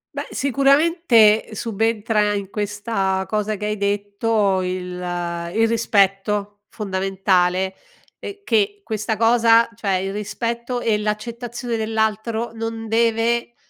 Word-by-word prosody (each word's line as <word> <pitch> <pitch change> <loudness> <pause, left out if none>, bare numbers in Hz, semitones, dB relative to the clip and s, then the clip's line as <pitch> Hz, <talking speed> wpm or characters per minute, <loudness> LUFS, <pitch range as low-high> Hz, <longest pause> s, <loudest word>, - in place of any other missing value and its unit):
Beh, - - -4
sicuramente 275 - +3
subentra, 215 -1 0
in 200 -2 -4
questa 205 -2 -2
cosa 215 0 -1
che 210 - -5
hai 210 0 -1
detto, 205 0 0
il 185 0 -2 0.7
il 225 +1 +3
rispetto 205 -2 +1
fondamentale, 190 -2 0 0.5
ehm, 400 - -7
che 205 -3 +1
questa 215 +1 -3
cosa 230 0 +5
cioè 200 -3 -1
il 190 +1 -2
rispetto 235 +4 -3
e 225 -3 +1
l'accettazione 235 +3 -4
dell'altro 220 +1 -1
non 225 0 -5
deve, 230 +1 +1
215 Hz, 110 wpm, -21 LUFS, 200-230 Hz, 0.7 s, cosa